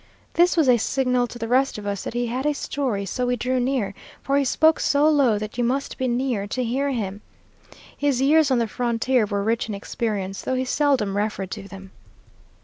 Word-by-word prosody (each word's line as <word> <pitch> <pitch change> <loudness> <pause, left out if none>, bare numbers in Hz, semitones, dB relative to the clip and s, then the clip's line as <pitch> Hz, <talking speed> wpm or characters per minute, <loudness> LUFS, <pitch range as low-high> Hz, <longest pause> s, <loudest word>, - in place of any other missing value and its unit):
This 350 +1 +3
was 315 -4 +4
a 250 -1 +6
signal 250 0 +1
to 240 - -9
the 230 -1 -4
rest 260 +2 +2
of 210 - -8
us 200 -1 -3
that - - -5
he 240 0 0
had 255 +4 -2
a 300 - +2
story, 255 -8 -2
so 250 +6 -2
we 245 - +1
drew 255 +2 -1
near, 245 -6 -1 0.3
for 275 - 0
he 280 - +3
spoke 315 +4 +3
so 290 +1 +3
low 275 -8 +3
that 215 +3 -6
you - - +2
must 265 +5 -2
be 260 - 0
near 240 -4 -1
to 255 +4 -2
hear 265 +4 -1
him. 205 -6 -3 0.7
His 285 -3 0
years 295 +2 +4
on 260 - +3
the 235 - +2
frontier 235 0 0
were 200 -1 -1
rich 225 +2 0
in 210 - -3
experience, 200 -2 -3
though 260 - -2
he 255 0 -1
seldom 255 -8 +1
referred 205 -2 -2
to 200 -2 -6
them. 195 -1 -11
245 Hz, 220 wpm, -23 LUFS, 210-270 Hz, 0.7 s, a